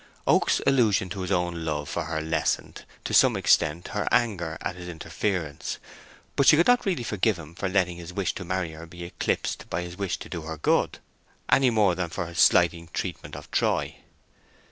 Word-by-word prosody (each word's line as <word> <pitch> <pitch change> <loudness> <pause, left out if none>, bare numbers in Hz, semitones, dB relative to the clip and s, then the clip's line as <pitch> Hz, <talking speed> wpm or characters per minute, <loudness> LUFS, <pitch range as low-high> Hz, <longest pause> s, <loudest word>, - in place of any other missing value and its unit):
Oak's - - +3
allusion 110 -8 +3
to 95 +2 -5
his 90 +1 -4
own 85 -2 0
love 75 -2 -2
for 85 0 -3
her 80 0 -2
lessened, 80 +1 -2 0.2
to - - -4
some - - +5
extent, 80 +3 +2
her 105 +1 -2
anger 90 -9 +1
at - - -4
his 90 -1 -9
interference; 85 -1 -3 0.6
but 140 - +3
she 150 - +8
could 170 - +5
not 245 -3 +3
really 175 -10 0
forgive 105 -1 +1
him 80 -1 -11
for 95 +2 -3
letting 90 -3 +1
his 85 0 -8
wish 90 0 -1
to 90 - -6
marry 90 -2 -2
her 80 +1 -10
be 85 +1 -10
eclipsed 85 - -2
by 90 - -2
his 90 0 -8
wish 100 -3 -1
to - - -9
do 85 - -5
her 80 +1 -6
good, 75 - +1 0.5
any 135 -2 +5
more 105 -5 +3
than 90 -1 -3
for 85 - -3
his 85 +1 -6
slighting 85 -1 +4
treatment - - -4
of - - -10
Troy. - - 0
90 Hz, 200 wpm, -26 LUFS, 85-100 Hz, 0.6 s, she